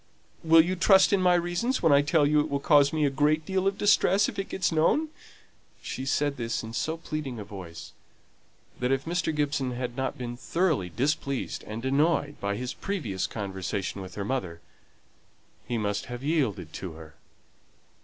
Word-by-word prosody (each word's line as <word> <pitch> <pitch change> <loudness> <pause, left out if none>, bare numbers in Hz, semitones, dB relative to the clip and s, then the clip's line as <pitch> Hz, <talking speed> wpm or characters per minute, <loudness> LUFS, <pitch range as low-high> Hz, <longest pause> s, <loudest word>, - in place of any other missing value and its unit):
"Will 165 0 +7
you 180 +3 -1
trust 190 +2 +5
in 195 - +3
my 180 -1 +4
reasons 175 +9 -1
when 160 - +5
I 140 - +6
tell 150 +1 +3
you 150 +1 +3
it 150 +1 0
will 140 -1 -1
cause 145 0 +4
me 155 -2 +1
a 140 - +1
great 150 +3 +1
deal 190 0 0
of 195 0 0
distress 205 -1 +4
if - - -5
it 195 - -3
gets 185 - 0
known?" 165 - +2 0.7
She 130 - -5
said 145 0 0
this 115 -1 -2
in 110 0 -7
so 160 +7 -2
pleading 155 -6 -5
a 105 - -5
voice, 95 -5 -9 0.9
that 125 +1 0
if 135 0 0
Mr. 170 0 -1
Gibson 145 -4 -1
had 120 -1 -4
not 130 0 -2
been 120 -1 -5
thoroughly 155 - 0
displeased 140 - -2
and 110 +3 -6
annoyed 145 +2 +1
by 100 0 -1
his 125 +3 -4
previous 120 - -3
conversation 95 -1 -4
with 95 -1 -9
her 100 - -3
mother, 100 -9 -3 1.1
he 120 - -1
must 105 -2 -2
have 120 0 -7
yielded 120 - -1
to 90 -4 -6
her. 80 -1 -12
140 Hz, 185 wpm, -27 LUFS, 115-165 Hz, 1.1 s, Will